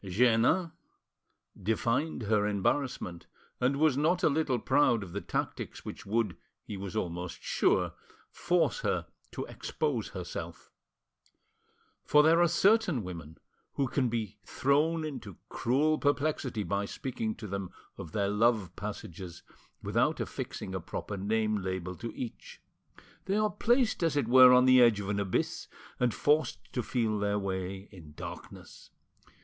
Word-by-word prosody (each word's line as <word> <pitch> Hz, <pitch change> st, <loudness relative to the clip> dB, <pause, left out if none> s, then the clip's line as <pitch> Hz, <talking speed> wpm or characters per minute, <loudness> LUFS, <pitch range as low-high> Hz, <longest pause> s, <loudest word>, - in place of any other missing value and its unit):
Jeannin 120 Hz, -, +3 dB, 0.9 s
divined 115 Hz, -, 0 dB
her 105 Hz, -1 st, +2 dB
embarrassment, 100 Hz, -3 st, -1 dB, 0.3 s
and 125 Hz, +2 st, +2 dB
was 155 Hz, -3 st, +4 dB
not 165 Hz, +5 st, +1 dB
a -, -, +5 dB
little 145 Hz, -3 st, +1 dB
proud 125 Hz, -3 st, +2 dB
of 90 Hz, -, -10 dB
the 100 Hz, -, -3 dB
tactics -, -, -4 dB
which -, -, -8 dB
would, 110 Hz, -2 st, 0 dB, 0.3 s
he 105 Hz, -, -7 dB
was 100 Hz, +1 st, -6 dB
almost 90 Hz, -3 st, -4 dB
sure; -, -, +1 dB, 0.4 s
force 180 Hz, -, +1 dB
her -, -, -1 dB, 0.3 s
to -, -, -4 dB
expose 465 Hz, -, -2 dB
herself. -, -, -7 dB, 1.3 s
For 150 Hz, 0 st, +5 dB
there 165 Hz, +2 st, +5 dB
are 175 Hz, -, +5 dB
certain 180 Hz, -, +3 dB
women 85 Hz, -4 st, -8 dB, 0.4 s
who 140 Hz, -, 0 dB
can 130 Hz, 0 st, 0 dB
be 110 Hz, -3 st, -3 dB
thrown 155 Hz, +4 st, +1 dB
into 115 Hz, -, -7 dB
cruel 150 Hz, +6 st, +1 dB
perplexity 145 Hz, -6 st, 0 dB
by 100 Hz, 0 st, -1 dB
speaking 110 Hz, -1 st, -4 dB
to 110 Hz, -, -9 dB
them 100 Hz, -2 st, -4 dB, 0.3 s
of 80 Hz, -, -8 dB
their 100 Hz, +1 st, 0 dB
love 105 Hz, -3 st, +2 dB
passages 85 Hz, 0 st, -7 dB, 0.4 s
without -, -, +1 dB
affixing 95 Hz, -, -5 dB
a 95 Hz, -, -2 dB
proper 100 Hz, +4 st, -5 dB
name 110 Hz, +2 st, 0 dB
label 95 Hz, -1 st, -3 dB
to 115 Hz, -, -5 dB
each. 120 Hz, -, -7 dB, 0.7 s
They 195 Hz, -, 0 dB
are 215 Hz, 0 st, +2 dB
placed 240 Hz, +2 st, +2 dB
as 165 Hz, -4 st, +1 dB
it 140 Hz, -, +1 dB
were 130 Hz, +1 st, +9 dB
on 125 Hz, 0 st, +6 dB
the 130 Hz, -1 st, +7 dB
edge 115 Hz, -4 st, +5 dB
of 100 Hz, -1 st, -4 dB
an 105 Hz, -1 st, 0 dB
abyss, 100 Hz, -2 st, -1 dB, 0.3 s
and 125 Hz, -1 st, +2 dB
forced 145 Hz, +5 st, 0 dB
to 125 Hz, -, 0 dB
feel 110 Hz, -3 st, -1 dB
their 105 Hz, 0 st, 0 dB
way 95 Hz, 0 st, -4 dB
in 80 Hz, -7 st, -13 dB
darkness. -, -, -10 dB
115 Hz, 145 wpm, -30 LUFS, 100-145 Hz, 1.3 s, were